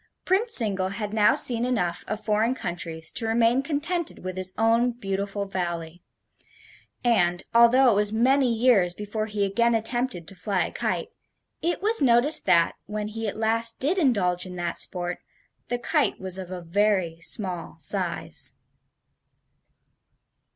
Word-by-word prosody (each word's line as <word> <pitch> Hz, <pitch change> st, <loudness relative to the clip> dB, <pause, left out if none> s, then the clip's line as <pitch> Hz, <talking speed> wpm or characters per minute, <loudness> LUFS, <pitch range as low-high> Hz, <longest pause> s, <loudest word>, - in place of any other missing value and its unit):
Prince 435 Hz, +5 st, +5 dB
Zingle 195 Hz, -5 st, +2 dB
had 205 Hz, +2 st, -5 dB
now 210 Hz, -1 st, +3 dB
seen 235 Hz, -2 st, +2 dB
enough 180 Hz, -9 st, -2 dB
of 215 Hz, 0 st, -5 dB
foreign 220 Hz, +4 st, +1 dB
countries 165 Hz, -5 st, -3 dB
to 225 Hz, -, +1 dB
remain 230 Hz, +3 st, +2 dB
contented 315 Hz, -, -3 dB
with 185 Hz, 0 st, -5 dB
his 185 Hz, 0 st, -1 dB
own 230 Hz, +2 st, +2 dB
beautiful 200 Hz, -2 st, -4 dB
Valley, 175 Hz, -3 st, -5 dB, 1.0 s
and, 180 Hz, -7 st, +1 dB
although 240 Hz, +2 st, +5 dB
it -, -, +1 dB
was 210 Hz, 0 st, +1 dB
many 255 Hz, +3 st, +2 dB
years 220 Hz, -7 st, +2 dB
before 210 Hz, +1 st, -4 dB
he 205 Hz, -1 st, -1 dB
again 235 Hz, +4 st, +1 dB
attempted 225 Hz, -5 st, -3 dB
to -, -, -9 dB
fly 195 Hz, 0 st, -2 dB
a -, -, -7 dB
kite, -, -, -3 dB, 0.5 s
it 345 Hz, +3 st, -2 dB
was 440 Hz, -2 st, +4 dB
noticed 260 Hz, +4 st, +5 dB
that, 170 Hz, -1 st, +4 dB
when 210 Hz, 0 st, -4 dB
he 225 Hz, +1 st, -5 dB
at 205 Hz, -, -5 dB
last 230 Hz, +1 st, +2 dB
did 330 Hz, +8 st, +1 dB
indulge 195 Hz, -, +1 dB
in 185 Hz, -1 st, -8 dB
that 175 Hz, -1 st, -4 dB
sport, 175 Hz, -1 st, -3 dB, 0.5 s
the 245 Hz, -, -2 dB
kite 240 Hz, -, 0 dB
was 190 Hz, 0 st, -1 dB
of 185 Hz, -2 st, -8 dB
a 185 Hz, -1 st, -7 dB
very 175 Hz, -2 st, 0 dB
small 180 Hz, -2 st, -4 dB
size. -, -, 0 dB
210 Hz, 150 wpm, -24 LUFS, 185-240 Hz, 1.0 s, Prince